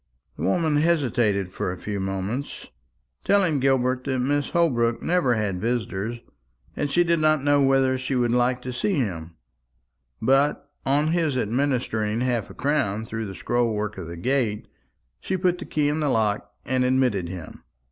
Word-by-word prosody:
The - - -9
woman 155 - +1
hesitated 125 - +1
for 90 - -3
a 90 - -6
few 105 +1 -4
moments, 95 +8 -4 0.6
telling 185 -7 +3
Gilbert 130 -1 +1
that 130 -2 -1
Mrs. 145 +3 0
Holbrook 120 -9 +1
never 170 -9 +2
had 100 -4 -2
visitors, 115 -1 -2 0.6
and 145 - -1
she 175 +5 +3
did 170 -1 +2
not 155 -2 +3
know 145 0 +4
whether 135 -1 +3
she 130 +1 -2
would 120 -2 +2
like 125 +1 +1
to 125 - -4
see 190 +11 0
him; 85 - -3 0.8
but 140 +2 +2 0.2
on 145 +3 +2
his 160 -5 +1
administering 120 -3 0
half 120 -4 -1
a - - -11
crown 110 -7 0
through 110 -1 -4
the 95 - -7
scroll 120 -1 0
work 105 -1 -3
of 85 - -6
the 85 0 -7
gate, 120 0 -1 0.5
she 190 - -2
put 180 -1 +1
the - - -6
key 150 -1 0
in 150 +2 0
the 150 -2 +1
lock 105 -3 0
and 130 0 +1
admitted 125 -9 +1
him. 90 -4 -9
125 Hz, 170 wpm, -24 LUFS, 105-145 Hz, 0.8 s, know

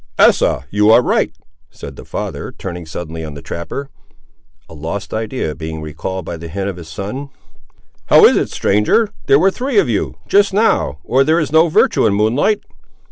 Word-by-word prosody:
"Asa, 70 - +3
you 105 +1 +3
are 115 +3 +6
right," - - +1 0.4
said - - -10
the - - -11
father, - - -5
turning 90 -3 -7
suddenly 80 0 -6
on 75 -2 -7
the 70 - -8
trapper, 110 - -6 0.8
a - - -13
lost 80 +7 -6
idea 110 -6 -3
being 80 +2 -6
recalled 80 +4 -5
by 85 - -5
the 85 +1 -8
hint 95 +4 -4
of 95 -3 -4
his 85 -2 -10
son. 105 - -6 0.8
"How - - +7
is - - +6
it, - - 0
stranger; 105 - +2 0.2
there 135 - +6
were 190 +6 +3
three 260 - -2
of 405 - +4
you, - - -2
just 200 -1 +3
now, 210 - +2
or 135 +2 +2
there 160 +4 +2
is 155 -3 -2
no 160 +2 +5
virtue 160 - +3
in 100 - +1
moonlight?" 125 - +1
100 Hz, 190 wpm, -17 LUFS, -, 0.8 s, How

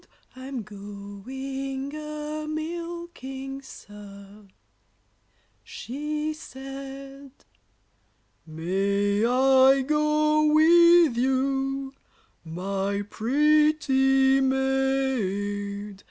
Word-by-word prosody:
I'm 260 -2 -6
going 260 +8 -7
a 305 0 -6
milking, 310 -4 -6
sir, 205 -3 -13 1.2
she 300 +4 -4
said. 275 -1 -9 1.2
May 200 +5 0
I 265 +2 +5
go 305 +1 +2
with 340 -2 +6
you, 270 +1 -1 0.5
my 195 +4 -3
pretty 270 0 +3
maid? 220 -7 -1
270 Hz, 55 wpm, -25 LUFS, 205-300 Hz, 1.2 s, with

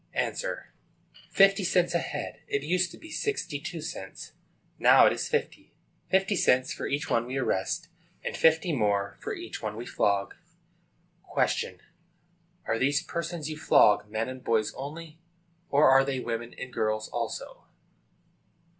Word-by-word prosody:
A. - - 0 0.9
Fifty 195 0 +5
cents 175 -1 +2
a 170 - +3
head. 150 -2 -5
It 140 - -1
used 180 +3 +1
to - - -12
be 325 - -12
sixty 425 -1 -2
two - - -6
cents. - - -7 0.5
Now - - +7
it - - +5
is - - -3
fifty. 460 -1 -3 0.3
Fifty 195 +2 +2
cents 130 -6 +3
for - - -4
each 145 +5 -2
one 115 +1 +1
we 130 +2 -3
arrest, 135 - -1 0.4
and - - -3
fifty 160 +1 +3
more 100 -5 0
for - - -4
each - - -7
one 105 -1 -4
we 115 +2 -6
flog. 100 -3 0 1.1
Q. 90 - -3 0.9
Are 115 - 0
these 140 +3 +2
persons 170 -2 -4
you 155 -1 -5
flog 105 -8 +4
men 110 +1 -2
and 130 0 -8
boys 110 -2 +1
only, 155 +3 -8 0.5
or 145 +2 +5
are 135 0 +7
they 135 -1 -2
women 120 -1 -4
and 130 -1 -7
girls 110 0 -1
also? - - -5
140 Hz, 155 wpm, -28 LUFS, 115-170 Hz, 1.1 s, Now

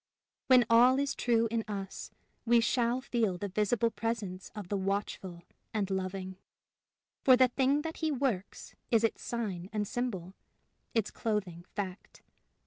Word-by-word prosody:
When 255 -2 +7
all 245 +3 +6
is 280 0 0
true 230 -1 +2
in 230 -1 0
us, 195 -2 -5 0.3
we 235 0 +5
shall 235 +2 +1
feel 225 -8 0
the 200 +3 -4
visible 215 +4 +1
presence 215 -6 -3
of 210 -4 -6
the 205 - -2
Watchful 190 -2 -3 0.3
and 200 -2 0
Loving; 190 0 -3 0.9
for 255 -2 +7
the 255 0 +5
thing 275 +3 +2
that 325 0 -5
he 315 - 0
works 250 -9 -2 0.2
is 230 -1 +3
its 225 - 0
sign 200 -7 -4
and 210 -1 -1
symbol, 195 -8 -3 0.6
its 220 -3 +1
clothing 190 -6 -2
fact. 190 -1 -6
220 Hz, 145 wpm, -31 LUFS, 190-240 Hz, 0.9 s, When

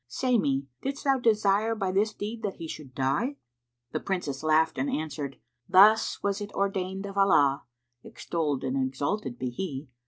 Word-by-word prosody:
Say 245 - +1
me, 135 -6 0 0.2
didst 275 +1 -4
thou 270 -2 +3
desire 215 -1 +2
by 195 -3 -1
this 205 +3 +2
deed 215 +2 -6
that 205 -3 -3
he 165 - -7
should 140 -5 -9
die?" 140 - 0 0.6
The - - -2
Princess 165 -8 -3
laughed 155 +1 +2
and 280 - 0
answered, 150 - -4 0.3
"Thus 210 +4 +5
was 200 +1 0
it 205 0 -5
ordained 195 0 -2
of 200 0 -4
Allah 145 -8 +4 0.4
(extolled 150 -5 -3
and 130 0 -1
exalted 135 - -2
be 125 -1 -3
He!) 140 -1 -5
190 Hz, 165 wpm, -28 LUFS, 140-210 Hz, 0.6 s, Thus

